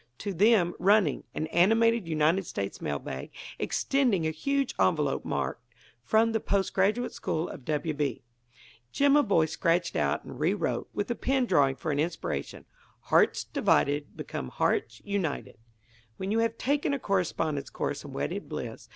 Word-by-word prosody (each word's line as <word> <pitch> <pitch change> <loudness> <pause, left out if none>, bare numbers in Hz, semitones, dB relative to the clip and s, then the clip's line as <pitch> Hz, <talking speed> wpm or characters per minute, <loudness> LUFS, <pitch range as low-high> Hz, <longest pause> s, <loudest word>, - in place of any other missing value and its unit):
To 200 - -4
them, 190 -2 +4
running, 195 -5 +3
an 155 - -1
animated 225 +3 +4
United 160 +3 +2
States 100 0 -4
mail 70 -1 -1
bag, 65 -1 -7 0.3
extending 245 -12 +1
a 160 - +1
huge 275 - -1
envelope - - +2
marked: - - -2 0.4
"From 225 +1 +3
the 225 - +1
Post 200 -2 0
Graduate 210 +6 +1
School 160 +2 -2
of 135 - -9
W. 155 +1 -1
B." 145 -5 -2 0.7
Jimaboy 275 - +4
scratched 170 +2 0
out - - 0
and - - -10
rewrote, - - 0
with 205 - -2
the - - +1
pen 260 +1 0
drawing 145 - +3
for 150 - -3
an 145 - -1
inspiration: 150 - -3 0.5
HEARTS - - +4
DIVIDED 145 +1 +1
BECOME 65 - -5
HEARTS 120 - -1
UNITED 190 - -3 0.6
when 190 +1 -3
you 225 - +2
have 230 0 0
taken 285 +1 0
a - - -4
Correspondence 165 - -1
Course - - -3
in - - -9
Wedded - - -4
Bliss. - - -6
185 Hz, 155 wpm, -28 LUFS, 155-225 Hz, 0.7 s, them